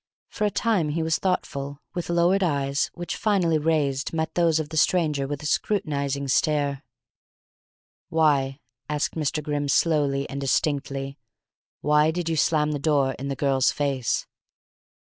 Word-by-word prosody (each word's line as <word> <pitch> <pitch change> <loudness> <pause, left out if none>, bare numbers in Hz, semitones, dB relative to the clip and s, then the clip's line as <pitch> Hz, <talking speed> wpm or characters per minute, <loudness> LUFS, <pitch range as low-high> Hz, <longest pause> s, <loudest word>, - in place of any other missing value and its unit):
For 215 - -2
a - - +3
time 200 -6 +1
he 160 +2 -1
was 160 0 0
thoughtful, 140 -6 -2
with 175 -1 -4
lowered 175 +3 +3
eyes, 140 -5 0
which, 175 0 -4
finally 180 -7 +2
raised, 150 -3 0
met 160 0 -2
those 165 -2 +2
of 155 -2 -4
the 160 - -7
stranger 155 -4 +2
with 145 0 -5
a - - -6
scrutinizing 140 -6 -1
stare. 140 0 +1 1.3
"Why," 145 -4 +2 0.3
asked 150 -1 -1
Mr. 155 -1 -2
Grimm 145 -1 -2
slowly 140 -2 +2
and 140 0 -5
distinctly, 140 -1 -1 0.6
"why 150 +1 +4
did 170 0 -2
you 165 - 0
slam 150 -1 +2
the 145 - -2
door 140 -2 +2
in 140 - -4
the 140 - -2
girl's 135 -2 +2
face?" 135 -4 -1
150 Hz, 150 wpm, -25 LUFS, 140-165 Hz, 1.3 s, why